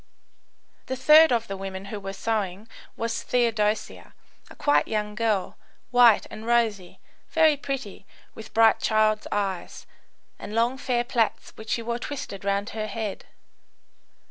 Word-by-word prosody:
The 260 - -2
third 305 +4 +7
of 230 -1 +1
the 195 - -4
women 190 0 -6
who 210 - -4
were 195 0 -6
sewing 205 -1 -3 0.3
was 230 0 -2
Theodosia, 220 -3 -1 0.3
a - - -13
quiet 290 - +2
young 210 -1 -2
girl, 215 -3 -1 0.3
white 245 -3 +6
and 215 - -8
rosy, 220 -6 0 0.3
very 320 -2 +4
pretty, 270 -8 -6 0.3
with 220 - -11
bright 225 0 +4
child's 215 -1 +1
eyes, 195 -4 -3 0.5
and 210 - -7
long 240 +3 +1
fair 245 -2 0
plaits 235 -2 -1
which 220 0 -11
she 230 - -1
wore 235 +1 -3
twisted 240 -7 -6
round 200 +1 -1
her 215 0 -4
head. 215 -1 -5
220 Hz, 145 wpm, -25 LUFS, 205-240 Hz, 0.5 s, third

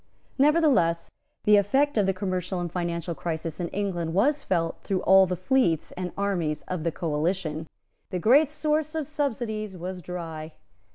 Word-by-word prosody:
Nevertheless, 275 - +3 0.3
the 210 0 +6
effect 270 +9 +2
of 205 -3 +2
the - - +4
commercial 185 -1 -2
and 175 -1 -3
financial 170 -1 -2
crisis 165 +2 -4
in 175 - -1
England 175 -4 -2
was 285 +9 +3
felt 165 -3 0
through 190 -2 -1
all 190 0 +6
the 180 - -1
fleets 185 - +1
and 180 -1 -5
armies 175 -7 -1
of 180 -4 -4
the 165 - 0
coalition. 160 0 -2 0.4
The 185 - -2
great 260 - +5
source 305 0 -1
of 315 -2 -1
subsidies 225 -9 -3
was 180 +1 -6
dry. 165 -3 -6
185 Hz, 160 wpm, -26 LUFS, 170-225 Hz, 0.4 s, the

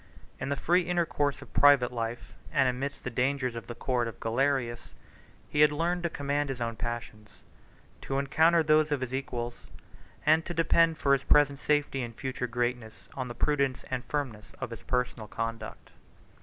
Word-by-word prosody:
In - - -3
the 140 - +1
free 175 +6 +3
intercourse 170 -5 0
of - - -18
private 140 -4 +5
life, 115 0 -4 0.2
and 135 - +3
amidst 130 +3 -3
the 125 - -4
dangers 130 0 0
of 115 - -7
the 120 - -6
court 120 0 0
of 115 - -8
Galerius, 120 0 -1 0.5
he 150 - +1
had 150 0 +7
learned 170 +4 0
to 170 - -1
command 145 -1 -1
his 135 -2 -4
own 115 -1 -2
passions, 110 -2 -5 0.7
to 135 - -2
encounter 160 +4 +4
those 155 0 +3
of 145 -3 0
his 130 0 -4
equals, 120 -3 -4 0.6
and 155 +2 +5
to 175 - -6
depend 165 0 +3
for 140 -2 +3
his 135 - +3
present 145 -1 +4
safety 145 -2 +1
and 120 -2 -6
future 130 -1 -3
greatness 120 -4 -3
on 130 -2 -4
the 120 - -7
prudence 140 -3 0
and 130 -1 -2
firmness 130 -8 -4
of - - -5
his 115 0 -7
personal 125 -3 -2
conduct. 115 0 -5
135 Hz, 180 wpm, -29 LUFS, 120-145 Hz, 0.7 s, had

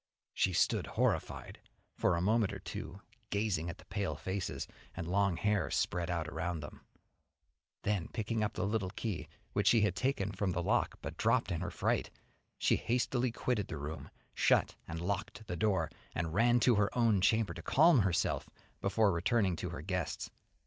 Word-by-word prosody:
She 95 - +2
stood 90 - +2
horrified - - -1 0.4
for 90 - +2
a 85 - 0
moment 105 +2 +2
or - - -5
two, 95 +6 -7 0.3
gazing 100 -6 0
at 85 - -6
the - - -16
pale 100 +1 -2
faces, 95 0 -3 0.3
and 85 - -3
long 100 -1 +2
hair 105 -5 +1
spread 85 0 0
out 85 -3 -1
around 80 +1 -3
them, 75 - -9 1.0
then 100 -5 0
picking 110 0 -2
up 105 - -1
the 90 - -1
little 100 -2 0
key 100 -2 -4 0.3
which - - +1
she 115 - +6
had 105 -3 +2
taken 125 -7 0
from 100 -2 -1
the 85 - -1
lock - - +1
but - - -5
dropped - - +2
in 85 -1 -1
her 90 - -2
fright, - - 0 0.5
she - - +3
hastily 125 +1 0
quitted 115 -3 -1
the 80 - -5
room, 75 +2 -6 0.2
shut - - +3
and 85 0 -4
locked 100 +4 -3
the 95 -4 -4
door, 95 +1 +1 0.2
and 80 -2 -2
ran 120 +5 +4
to 125 - +5
her 105 -2 +3
own 115 -5 +4
chamber 110 -2 +3
to - - -8
calm 160 -1 +5
herself 100 -5 +1 0.3
before 100 +1 +3
returning 95 +2 +2
to 90 - -3
her 85 -3 -6
guests. 90 -1 -3
100 Hz, 180 wpm, -33 LUFS, 85-110 Hz, 1.0 s, she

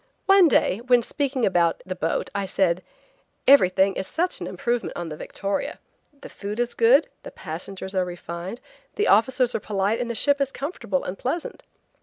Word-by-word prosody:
One 390 -2 +7
day, 225 -7 +2
when 245 -1 +3
speaking 270 -2 -1
about 175 -3 +1
the 185 - -3
boat, 165 -2 -2
I 200 -1 -2
said: 185 -2 +1 0.7
"Everything 195 -7 +5
is 190 - -4
such 355 +2 -1
an - - -4
improvement 240 0 -2
on 175 -1 -4
the 155 - -6
Victoria. 195 +5 -4 0.4
The - - -8
food 205 +2 -6
is 240 0 0
good, 250 +6 +5
the - - -9
passengers 190 - -7
are 185 -1 +1
refined, 175 +4 -7 0.3
the 420 - +1
officers 245 +3 +3
are - - 0
polite 205 +2 -1
and 240 - -3
the 235 - -3
ship 285 +4 +2
is 275 -1 0
comfortable 270 - -3
and 185 +1 -6
pleasant." 320 +7 -4
210 Hz, 180 wpm, -24 LUFS, 185-260 Hz, 0.7 s, One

